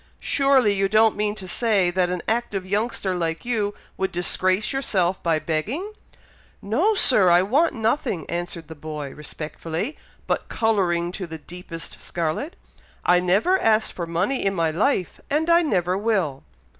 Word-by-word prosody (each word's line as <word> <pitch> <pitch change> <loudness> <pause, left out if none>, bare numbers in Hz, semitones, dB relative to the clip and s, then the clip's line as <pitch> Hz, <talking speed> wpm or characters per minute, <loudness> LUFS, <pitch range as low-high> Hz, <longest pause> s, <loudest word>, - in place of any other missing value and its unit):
Surely 270 -6 +3
you 195 0 +1
don't 220 +1 +4
mean 210 0 0
to 190 -3 -8
say 200 -3 +2
that 180 0 +1
an 180 -1 -3
active 220 -4 -1
youngster 205 -1 -1
like 165 0 -2
you 215 -4 -1 0.2
would 190 0 -1
disgrace 185 +4 +1
yourself 190 -9 0
by 165 -2 +2
begging?" 210 - -3 0.7
"No, 315 - +1
Sir! 210 - +5
I 175 +1 +5
want 280 - +2
nothing!" 220 - -1
answered 170 -2 -4
the 160 - -8
boy 150 -2 -6
respectfully, 160 - -5 0.3
but - - -2
colouring 180 -7 +1
to 185 -1 -5
the 160 -1 -7
deepest 170 +1 -8
scarlet. 170 - -3 0.5
"I 180 0 +5
never 200 - +2
asked 220 0 +2
for 170 -2 -4
money 185 +11 0
in 195 0 +1
my 165 -2 +1
life, 185 - 0
and 315 +4 +1
I 340 +1 +6
never 185 - +1
will." 195 -9 0
190 Hz, 155 wpm, -23 LUFS, 170-225 Hz, 0.7 s, I